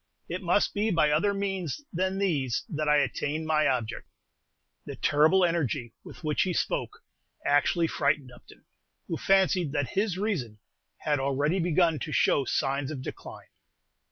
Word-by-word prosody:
It 180 +2 -4
must 180 +2 +2
be 210 +2 0
by 165 -6 +3
other 165 +7 +2
means 195 - -3
than 185 +2 -1
these 145 -11 0
that 155 -1 -1
I 150 - +5
attain 145 +3 -1
my 155 -1 +2
object!" 120 -4 -2 0.8
The - - -7
terrible 160 +6 +4
energy 145 -8 -1
with - - -12
which 150 -1 0
he 185 - 0
spoke - - -2 0.4
actually 145 +4 +3
frightened 145 -4 0
Upton, - - -17 0.4
who - - -2
fancied 190 -5 +2
that 145 -3 -1
his 195 -2 -1
reason 170 - -2 0.4
had 150 -2 0
already 140 +6 0
begun 165 -2 +2
to 155 - -5
show 140 -2 +2
signs 135 +2 -1
of 140 -4 -6
decline. - - -9
155 Hz, 155 wpm, -28 LUFS, 140-185 Hz, 0.8 s, I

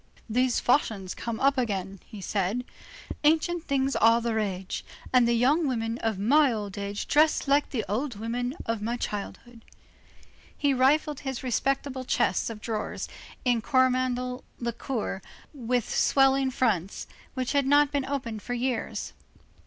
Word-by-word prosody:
"These 250 +2 +2
fashions 215 -8 +1
come 230 -1 -5
up 275 0 +3
again," 195 -5 -2 0.2
said 205 +6 -1 0.6
he, 295 - +6
"ancient 335 +2 0
things 275 -1 0
are 230 +1 +5
the 235 -1 -1
rage, 195 -4 -2 0.3
and 250 -2 +5
the 235 - +3
young 285 +7 +3
women 230 -2 -2
of 225 -3 -1
my 275 +8 +4
old 205 -3 -4
age 200 0 -4
dress 305 0 +3
like 285 +1 +3
the 230 -5 -2
old 240 +6 -2
women 245 +5 -3
of 225 -2 -2
my 235 +3 -2
childhood." 230 +2 -6 0.9
He 285 -1 +2
rifled 285 +3 +2
his 265 -3 -5
respectable 260 +1 -1
chests 190 -6 +1
of 220 -2 -8
drawers 220 -2 -3 0.4
in 240 -2 +2
Coromandel 255 0 +1 0.2
lacquer, 235 -4 -3 0.3
with 245 -4 -1
swelling 270 -1 +3
fronts, 210 -8 0 0.3
which 255 -1 -1
had 280 -2 +2
not 290 +1 +5
been 280 -2 0
opened 255 -6 -4
for 245 +4 -4
years. 245 -1 -2
245 Hz, 145 wpm, -27 LUFS, 220-270 Hz, 0.9 s, he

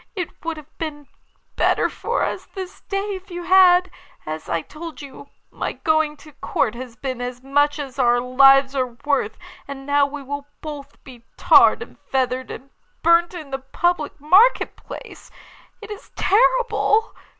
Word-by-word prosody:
It 360 -4 -6
would 330 -1 -3
have 305 0 -14
been 295 -3 -6 0.5
better - - +2
for 475 +2 -2
us - - -4
this 380 0 -7
day 400 +1 -2
if 385 +1 -9
you 350 -1 -6
had. 365 0 +5 0.3
As 155 0 -6
I 165 - 0
told 320 +1 -9
you, 280 0 -11 0.2
my - - -4
going 315 -2 0
to 305 - -13
Court 245 -6 -1
has 240 -1 -9
been 255 0 -5
as 250 0 -6
much 290 +2 +2
as 275 -2 -7
our 240 -1 +4
lives 270 +2 +5
are 250 -3 -2
worth, 280 -7 0 0.3
and 275 -1 -8
now 285 0 +3
we 285 0 -8
will 285 +1 -6
both 290 -2 -9
be 245 -3 -14
tarred - - +5
and - - -17
feathered, 255 -1 -2
and 270 +2 -9 0.3
burnt 340 +2 +4
in 310 -5 -9
the 270 - -3
public 310 +4 -1
market 375 - +4
place. - - -11 0.5
It 425 - -9
is 415 - -9
terrible! 455 0 +2
290 Hz, 165 wpm, -21 LUFS, 265-350 Hz, 0.5 s, had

